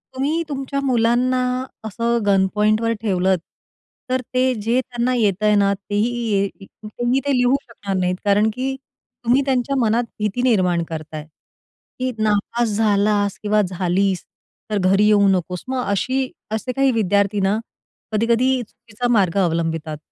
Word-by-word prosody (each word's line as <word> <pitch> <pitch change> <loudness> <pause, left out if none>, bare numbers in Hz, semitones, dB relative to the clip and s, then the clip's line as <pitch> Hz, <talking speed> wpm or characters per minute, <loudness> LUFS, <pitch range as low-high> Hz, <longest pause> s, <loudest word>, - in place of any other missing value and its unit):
तुम्ही 290 +5 0
तुमच्या 275 -1 -3
मुलांना 250 0 +2 0.5
असं 230 +2 -1
गनपॉईंटवर 210 +3 +2
ठेवलंत, 190 -3 +1 0.7
तर 255 0 +1
ते 255 0 +2
जे 230 +4 +1
त्यांना 245 0 -2
येतंय 210 -2 +2
ना, 200 -1 +3
तेही 205 +2 -1 0.2
ये 200 -1 +2 0.4
तेही 240 +4 0
ते 285 - +1
लिहू 250 +1 +3
शकणार 205 -5 -6
नाहीत. 180 0 0
कारण 205 +2 +3
की 265 +3 -2 0.5
तुम्ही 250 +4 +4
त्यांच्या 265 0 0
मनात 230 0 +2 0.2
भीती 210 +3 -1
निर्माण 185 -9 +2
करताय, 155 -1 -6 0.7
की 255 0 -1
"नापास 215 +2 +1
झालास 205 -1 +2
किंवा 210 0 +3
झालीस, 185 0 0 0.5
तर 210 - 0
घरी 200 +2 +4
येऊ 205 -1 +5
नकोस." 180 -2 0
मग 260 -1 -1
अशी 255 +6 0 0.2
असे 220 +3 -2
काही 270 +1 +2
विद्यार्थी 205 -2 +1
ना, 195 +3 +1 0.5
कधी-कधी 235 +4 +2
चुकीचा 235 +1 -6
मार्ग 195 -4 +2
अवलंबितात. 165 -2 -2
215 Hz, 135 wpm, -21 LUFS, 195-245 Hz, 0.7 s, येऊ